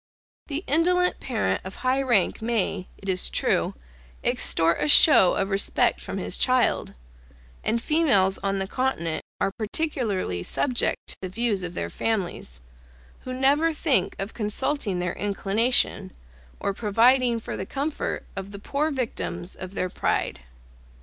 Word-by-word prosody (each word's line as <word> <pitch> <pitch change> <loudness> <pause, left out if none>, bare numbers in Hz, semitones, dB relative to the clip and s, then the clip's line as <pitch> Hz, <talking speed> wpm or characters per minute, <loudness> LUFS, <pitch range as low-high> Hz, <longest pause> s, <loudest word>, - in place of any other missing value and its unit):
The 300 +3 -4
indolent 360 +4 +2
parent 155 - -1
of 190 - -7
high 260 +1 0
rank 235 -9 +2
may, 220 -5 -1
it 195 - -12
is 185 -1 +1
true, - - 0 0.5
extort 165 +1 +2
a - - +1
show 290 - +8
of 195 +1 -1
respect 195 +1 +2
from - - -6
his - - -2
child, 255 -2 +1 0.7
and 230 +2 +1
females 230 - +2
on 195 0 -1
the 195 - -1
continent 195 -8 -2 0.2
are - - 0
particularly 215 - -2
subject 245 - -1
to - - -4
the 185 - -5
views 220 0 0
of 175 -1 -5
their 85 0 -3
families, 180 - -2 0.6
who 255 - -5
never 285 +5 +3
think 280 - +1
of 195 +3 -5
consulting 215 -1 -1
their 180 -1 -2
inclination, 205 0 0 0.5
or 200 - -1
providing 235 +4 +3
for - - -6
the 190 - -5
comfort 285 +2 -3
of 195 0 -6
the 200 - -8
poor 280 +9 -1
victims 90 - -4
of 185 +1 -9
their 185 - -1
pride. - - -1
215 Hz, 145 wpm, -25 LUFS, 190-265 Hz, 0.7 s, show